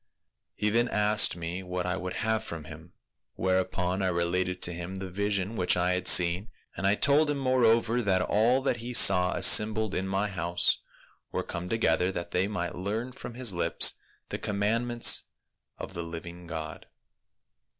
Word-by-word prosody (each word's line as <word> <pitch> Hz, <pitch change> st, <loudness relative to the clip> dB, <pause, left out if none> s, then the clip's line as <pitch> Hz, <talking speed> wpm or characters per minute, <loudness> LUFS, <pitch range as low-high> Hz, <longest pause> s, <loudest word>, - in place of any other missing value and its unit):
He 105 Hz, 0 st, -1 dB
then 120 Hz, +2 st, +2 dB
asked 105 Hz, -3 st, +2 dB
me 85 Hz, +2 st, -5 dB
what 90 Hz, -1 st, -4 dB
I 90 Hz, 0 st, -1 dB
would 90 Hz, -1 st, -5 dB
have 110 Hz, 0 st, 0 dB
from 85 Hz, -7 st, -7 dB
him, 80 Hz, +3 st, -13 dB, 0.4 s
whereupon 95 Hz, 0 st, -1 dB
I 95 Hz, -, 0 dB
related 90 Hz, +1 st, -1 dB
to 85 Hz, -, +1 dB
him 90 Hz, +2 st, -7 dB
the 95 Hz, -1 st, -6 dB
vision 100 Hz, +2 st, -2 dB
which 90 Hz, -3 st, +2 dB
I 90 Hz, +1 st, +1 dB
had 90 Hz, 0 st, -3 dB
seen; 90 Hz, +5 st, +4 dB, 0.3 s
and 95 Hz, -, -1 dB
I 100 Hz, -, +3 dB
told 145 Hz, +5 st, +3 dB
him 145 Hz, -, -1 dB
more 130 Hz, -2 st, +1 dB
over, 115 Hz, +1 st, +2 dB
that 95 Hz, -4 st, +1 dB
all 120 Hz, +7 st, +2 dB
that 135 Hz, -, 0 dB
he 120 Hz, +2 st, -6 dB
saw 90 Hz, -4 st, +5 dB
assembled 110 Hz, -1 st, +4 dB
in 95 Hz, +1 st, -2 dB
my 95 Hz, +2 st, -1 dB
house 85 Hz, -3 st, 0 dB, 0.5 s
were -, -, -2 dB
come 85 Hz, +1 st, -6 dB
together 95 Hz, -4 st, +1 dB
that 85 Hz, -1 st, -6 dB
they 90 Hz, +2 st, 0 dB
might 90 Hz, -4 st, -4 dB
learn 110 Hz, +7 st, -4 dB
from 120 Hz, -1 st, -10 dB
his 125 Hz, -5 st, 0 dB
lips 85 Hz, -, +2 dB, 0.3 s
the -, -, -5 dB
commandments 115 Hz, +3 st, +1 dB, 0.5 s
of -, -, -8 dB
the 85 Hz, -, -5 dB
living 85 Hz, +1 st, -9 dB
God. 80 Hz, -1 st, -7 dB
95 Hz, 175 wpm, -28 LUFS, 90-110 Hz, 0.5 s, saw